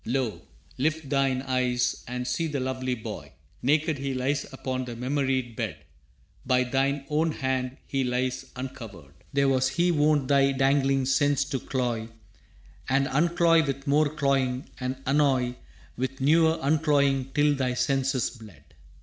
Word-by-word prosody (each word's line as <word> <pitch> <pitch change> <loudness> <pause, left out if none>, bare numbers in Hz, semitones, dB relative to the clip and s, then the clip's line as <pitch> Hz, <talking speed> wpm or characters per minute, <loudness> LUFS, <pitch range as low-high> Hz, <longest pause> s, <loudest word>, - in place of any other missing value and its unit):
Lo, 125 -2 -2 0.4
lift 155 +1 -1
thine 135 -2 +1
eyes 125 -2 0
and 125 +1 -4
see 165 - -1
the 145 -3 -2
lovely 130 0 -2
boy! 110 - -8 0.3
Naked 150 +2 +1
he 135 -1 -3
lies 135 +3 -1
upon 130 -1 -3
that 120 -2 -7
memoried 130 -2 -1
bed; - - -3 0.7
By 125 0 +2
thine 135 +2 0
own 155 +2 +1
hand 130 -1 -2
he 135 -1 -1
lies 130 +1 -1
uncovered. 115 - -8 0.2
There 140 -1 +2
was 130 -1 +2
he 175 +5 +2
wont 150 -3 +2
thy 140 0 +4
dangling 135 0 +2
sense 140 +1 +2
to 140 -2 -3
cloy, 120 -4 -2 0.8
And 135 +1 +3
uncloy 170 +2 +3
with 135 0 -3
more 145 +1 +3
cloying, 135 -3 0
and 130 0 -3
annoy 135 -3 +2 0.4
With 130 +2 -3
newer 160 +4 +4
uncloying 140 -3 +2
till 145 0 +4
thy 130 -3 -1
senses 135 0 0
bled. 110 - -14
135 Hz, 145 wpm, -26 LUFS, 130-145 Hz, 0.8 s, thy